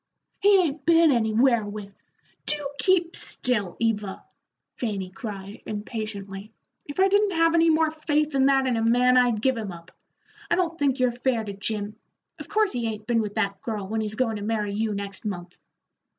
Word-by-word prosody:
"He 405 0 +6
ain't 310 -6 0
been 330 0 +5
anywhere 235 0 +3
with 205 -1 -7 0.3
" - - -38
"Do 295 -2 -1
keep 355 -3 +2
still, 210 -8 -1
Eva!" 210 -4 -1 0.5
Fanny 200 -6 -3
cried, 200 -2 -7
impatiently. 210 -2 -6 0.4
"If 290 +5 -7
I 385 - +6
didn't 405 0 +3
have 330 0 +4
any 330 0 +4
more 320 0 +3
faith 305 -1 0
than 270 -1 +3
that 270 -1 +3
in 250 -3 +1
a - - 0
man, 245 +2 +4
I'd 240 -4 +3
give 260 -1 +3
him 215 -4 -4
up. 170 0 -12 0.6
I - - +3
don't 340 -2 -1
think 275 -2 +1
you're 250 -1 +3
fair 240 -1 0
to 205 -2 -6
Jim. 210 +1 -4 0.4
Of - - -9
course 425 -1 +2
he 240 -2 -2
ain't 215 -1 -5
been 230 0 +2
with 210 -1 -5
that 200 -3 -1
girl, 210 -4 -4
when 220 +2 -1
he's 215 0 -3
goin' 225 -2 0
to - - -7
marry 210 -1 -1
you 215 0 -1
next 200 0 -6
month." 180 -4 -6
230 Hz, 195 wpm, -25 LUFS, 210-285 Hz, 0.6 s, He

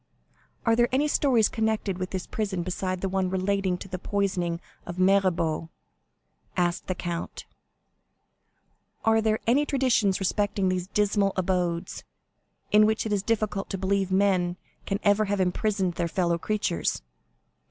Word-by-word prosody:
"Are 230 -1 +4
there 240 +1 +3
any 275 +4 +2
stories 255 -7 +3
connected 220 -4 -1
with 185 0 -3
this 185 -2 -4
prison 195 -5 -2
besides 185 0 -3
the - - +1
one 190 -1 0
relating 190 0 0
to 195 - -9
the 185 -1 -5
poisoning 185 -4 -1 0.2
of 175 0 -7
Mirabeau?" 180 -4 +2 0.9
asked 175 -1 0
the 185 - -1
count; 170 -1 -5 1.6
"are 225 0 +4
there 220 0 +2
any 260 +6 +4
traditions 250 -9 +2
respecting 200 0 0
these 185 -1 -1
dismal 205 -1 +1
abodes,—in 185 +3 -1
which 220 +1 0
it 215 - -1
is 200 - +1
difficult 210 -2 -1
to 195 - -3
believe 195 0 0
men 185 -2 +2 0.3
can 195 0 -1
ever 205 +1 +4
have 200 0 -1
imprisoned 190 0 0
their 170 0 -1
fellow 170 -1 0
creatures?" 200 - -1
195 Hz, 140 wpm, -26 LUFS, 180-210 Hz, 1.6 s, Are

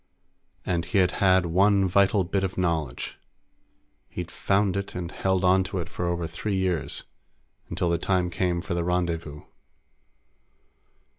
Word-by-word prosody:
And 85 -2 0
he 95 +4 -1
had 90 -1 +4
had 95 -2 +5
one 95 +3 +3
vital 100 +2 +3
bit 95 +2 -1
of 95 -1 -3
knowledge. 80 -8 -2 0.9
He'd - - -6
found 100 -1 +1
it 100 0 -4
and 85 -2 -4
held 95 -1 0
on 95 +1 +4
to 95 - -4
it 85 -2 -4
for 90 - -4
over 85 -1 -1
three 90 +5 -3
years, 95 -3 -1 0.7
until 85 - -1
the 85 - +1
time 90 -1 0
came 90 -1 0
for 95 - -4
the 85 0 -1
rendezvous. 85 -4 -2
90 Hz, 150 wpm, -26 LUFS, 85-95 Hz, 0.9 s, had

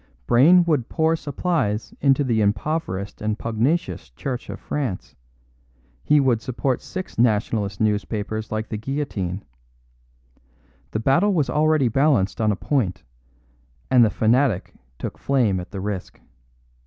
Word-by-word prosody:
Brayne 160 - +6
would 150 -8 0
pour 160 0 +2
supplies 145 - -2
into 140 0 +3
the 115 -4 +1
impoverished 105 - -2
and 105 0 -1
pugnacious 120 +11 -1
Church 125 -3 -5
of - - -6
France; 130 -11 -4 0.9
he 150 - +4
would 125 -5 +2
support 130 +2 -2
six 185 -10 -7
Nationalist 105 -3 +1
newspapers 105 +1 -1
like 110 0 -3
The 110 - -3
Guillotine. 110 -8 -3 1.4
The 110 - -2
battle 170 - +3
was 150 -5 +1
already 155 -3 +3
balanced 120 -5 +2
on 110 -1 +3
a - - 0
point, 95 -6 -1 0.9
and 125 -2 +7
the 110 - +4
fanatic 115 -2 +1 0.2
took - - -6
flame 120 -9 +1
at 90 - -8
the 100 - -6
risk. 100 -2 -5
120 Hz, 130 wpm, -23 LUFS, 105-145 Hz, 1.4 s, and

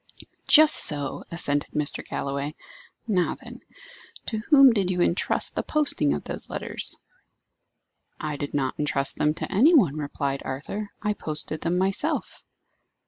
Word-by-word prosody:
"Just 310 0 +7
so," 145 -2 +3
assented 145 -4 +1
Mr. 150 -1 -2
Galloway. 140 +2 -5 0.5
"Now, 185 -5 0
then, - - -13 0.6
to 220 - -3
whom 275 -5 +7
did 195 -4 -1
you 180 -1 -2
intrust 175 0 0
the - - -2
posting 295 - +2
of - - -6
those - - -6
letters?" - - -3 1.2
"I 155 -1 -4
did 145 0 -6
not 135 -2 -2
intrust 140 -2 0
them 150 +1 0
to - - -6
any 280 - +4
one," 170 - +3
replied 140 -2 -4
Arthur; 175 +11 -6
"I 210 - 0
posted 155 -3 -2
them 170 +1 -1
myself." 195 - -2
160 Hz, 140 wpm, -24 LUFS, 145-210 Hz, 1.2 s, Just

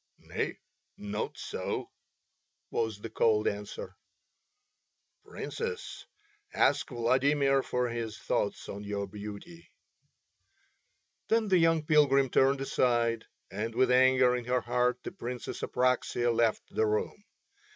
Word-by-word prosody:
"Nay, - - -4 0.4
not 105 +1 -4
so," - - -4 0.8
was 110 -3 -2
the 115 - -6
cold 110 -1 +2
answer. 105 0 -4 1.3
"Princess, 465 -1 -6 0.5
ask 145 +2 +2
Vladimir 135 +3 +2
for 125 -1 -1
his 115 -2 -4
thoughts - - -2
on 100 +1 -6
your 100 0 -3
beauty." 105 - -9 1.6
Then 225 -2 +2
the 185 -2 +5
young 165 -2 +3
pilgrim 140 -4 +4
turned 135 +1 +3
aside, 120 -3 +1 0.3
and 110 +4 -4
with 125 0 +3
anger 130 0 +5
in 125 -1 -4
her 125 +1 +1
heart 125 +1 +1
the - - -5
Princess 125 0 -6
Apraxia 125 -1 +1
left 115 -1 +1
the 110 - +1
room. 105 - -2
125 Hz, 115 wpm, -30 LUFS, 110-135 Hz, 1.6 s, the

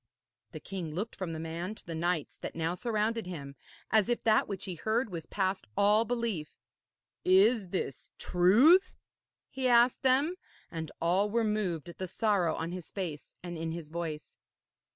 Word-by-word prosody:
The - - -7
king 170 -6 -6
looked 210 +6 -3
from 185 -3 -4
the 160 - -5
man 170 +5 -4
to - - -11
the 170 - -5
knights 165 -1 -1
that - - -6
now 165 +1 -1
surrounded 220 +1 -1
him, 140 -6 -7 0.4
as 220 0 +4
if 240 - 0
that 220 -1 +4
which 195 -2 -5
he 185 - -4
heard 220 +6 -1
was 165 -3 -6
past 190 -1 -1
all 210 +3 +4
belief. 230 -10 -2 0.7
'Is 195 +2 +4
this 155 -8 -4
truth?' 255 - +5 0.6
he 260 -1 -1
asked 240 0 +5
them, 275 +7 +3 0.3
and 160 -2 -5
all 185 +5 +2
were 230 +2 +1
moved 205 -8 -1
at 170 - -11
the 185 - -3
sorrow 190 -4 +1
on 165 +1 -3
his 180 -2 -7
face 170 -7 -5
and 175 -2 -6
in 160 0 -3
his 165 -3 -7
voice. 160 -2 -4
185 Hz, 170 wpm, -30 LUFS, 165-220 Hz, 0.7 s, truth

